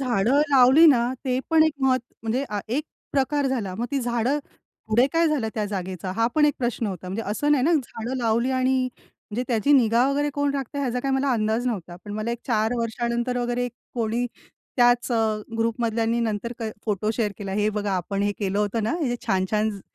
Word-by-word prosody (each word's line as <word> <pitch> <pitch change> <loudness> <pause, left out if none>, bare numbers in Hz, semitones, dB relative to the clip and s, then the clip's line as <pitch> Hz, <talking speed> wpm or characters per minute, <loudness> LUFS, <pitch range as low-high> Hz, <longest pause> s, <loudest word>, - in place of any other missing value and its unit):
झाडं 250 +2 +2
लावली 270 +4 +7
ना, 245 -4 +4
ते 255 -1 0
पण 320 -1 +6
एक 315 - +2
महत्त्वाचा 255 -2 0
म्हणजे 230 +5 -1
हा 205 -1 -2 0.2
एक 300 - -1 0.3
प्रकार 280 +1 +1
झाला. 220 -8 -2
मग 230 +5 -3
ती 280 - 0
झाडं, 240 +3 0 0.5
पुढे 235 +4 +4
काय 330 0 +3
झालं 275 -8 0
त्या 215 - -1
जागेचं? 190 -2 -4
हा 230 0 +3
पण 305 - +4
एक 295 -2 +3
प्रश्न 240 -2 -1
होता. 185 -2 -5
म्हणजे 200 +5 -3
असं 290 +8 +1
नाही 270 -4 +3
ना, 335 - +3
झाडं 250 -3 -3
लावली 235 +1 +1
आणि 260 0 +2 0.5
म्हणजे 225 +4 -2
त्याची 245 +4 +2
निगा 240 -2 +4
वगैरे 290 +1 0
कोण 285 0 +1
राखतंय 275 +1 -3
ह्याचा 250 -2 -1
काही 270 +1 0
मला 270 +1 +1
अंदाज 220 +1 0
नव्हता. 180 -7 -3
पण 205 - -7
मला 215 +2 -2
एक 235 - -3
4 220 -2 +1
वर्षानंतर 235 +1 -1
वगैरे 245 0 -1 0.3
कोणी 235 +1 0 0.5
त्याच 245 0 +4
अ, - - +2 0.4
ग्रुप 230 +1 0
मधल्यांनी 230 0 0
नंतर 225 0 -2
क 220 -1 -2
फोटो 210 0 0
शेअर 215 -3 -1
केला, 195 -2 -5
हे 210 +2 +1
बघा 205 -1 -2
आपण 195 +3 -2
हे 205 0 +1
केलं 200 -1 -1
होतं 210 +2 0
ना, 220 - 0
इथे 245 - -1
छान-छान 210 +2 +1
झ 200 -2 -8
235 Hz, 210 wpm, -24 LUFS, 215-260 Hz, 0.5 s, लावली